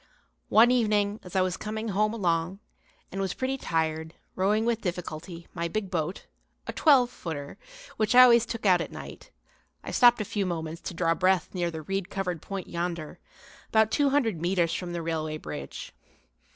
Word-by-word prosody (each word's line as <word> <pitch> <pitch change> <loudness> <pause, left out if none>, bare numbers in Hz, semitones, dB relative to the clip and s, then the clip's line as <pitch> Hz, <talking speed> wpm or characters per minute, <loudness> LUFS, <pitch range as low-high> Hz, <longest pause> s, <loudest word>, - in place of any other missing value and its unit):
One 230 +3 +6
evening 210 -3 +2
as 180 +1 -11
I 190 - +4
was 185 0 0
coming 220 +2 -4
home 210 +2 +1
along 180 -3 -1 0.5
and 195 - -3
was 190 -2 -2
pretty 260 +1 -1
tired, 160 -7 -2 0.2
rowing 210 +4 +2
with 230 -1 0
difficulty 170 -1 -5
my 170 -1 -2
big 195 +2 -3
boat, 170 +1 -2 0.4
a - - -5
twelve 260 -6 +4
footer, 145 - -7 0.4
which 215 +2 +1
I 255 - +11
always 235 -2 +6
took 230 -2 -5
out 180 -3 +5
at - - -5
night, - - -10 0.5
I - - -6
stopped 240 -1 +6
a 215 - -2
few 200 -1 -2
moments 165 -2 -4
to 180 - -9
draw 165 -1 +2
breath 185 0 +1
near 175 -2 -1
the 160 -1 -7
reed 195 +3 -3
covered 180 -5 -3
point 195 -2 -5
yonder, 170 -2 -4 0.5
about 220 0 +3
two 285 -1 +3
hundred 230 - +1
metres 175 -2 +1
from 180 0 -4
the 170 -1 -3
railway 155 -1 -2
bridge. 75 - -7
185 Hz, 180 wpm, -27 LUFS, 165-215 Hz, 0.5 s, I